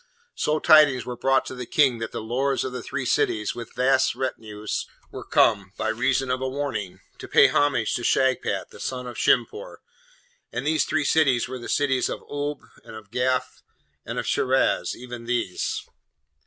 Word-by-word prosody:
So 150 +1 0
tidings 150 -5 +5
were 125 - -5
brought 135 +1 +2
to - - -6
the 125 -2 -7
King 140 -8 +3
that 115 - -4
the - - -5
Lords 130 +4 0
of 130 - -4
three 135 -2 -4
cities, 105 -2 +1
with 120 -2 -9
vast 130 +1 +2
retinues, 110 -5 -4 0.2
were - - -7
come, 100 -4 +2
by 110 - -1
reason 125 +3 0
of 130 +1 -1
a 130 - -1
warning, 105 -10 -4 0.2
to - - -8
pay - - +6
homage 140 -6 +1
to 120 - -2
Shagpat, 130 +2 +1
the - - -13
son 125 -1 -4
of 125 - -7
Shimpoor; 460 +4 0 0.7
and 125 +3 -4
these 155 +1 +2
three 150 -2 0
cities 140 -7 +3
were 130 0 -6
the 120 - -8
cities 135 -3 +1
of - - -5
Oolb, 145 0 -4 0.2
and 110 - -11
of 105 -2 -12
Gaf, 130 +1 -1 0.4
and - - -6
of - - -2
Shiraz, 130 +1 +1
even 120 -1 -9
these! 120 -6 -2
130 Hz, 180 wpm, -24 LUFS, 115-140 Hz, 0.7 s, pay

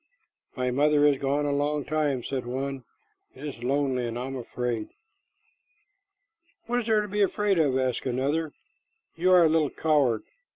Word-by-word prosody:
"My 125 -1 -1
mother 145 +2 +3
is 145 -2 +3
gone 140 +2 0
a 145 - 0
long 145 0 0
time," 145 -4 0
said 130 -2 -4
one. 135 +1 -4 0.5
"It - - -9
is 135 -5 -7
lonely, 130 -2 0
and 115 0 -4
I 125 - -3
am 135 0 -5
afraid." 120 -2 -3 1.8
"What 245 +1 0
is 240 - -4
there 220 -1 +3
to 210 - -4
be 205 +1 -1
afraid 200 -1 +2
of?" 140 -5 +2
asked 130 0 -1
another. 145 +5 -1 0.6
"You 180 +3 +2
are 180 -1 +7
a - - +6
little 155 -2 +2
coward. 140 -9 +1
140 Hz, 170 wpm, -27 LUFS, 130-155 Hz, 1.8 s, are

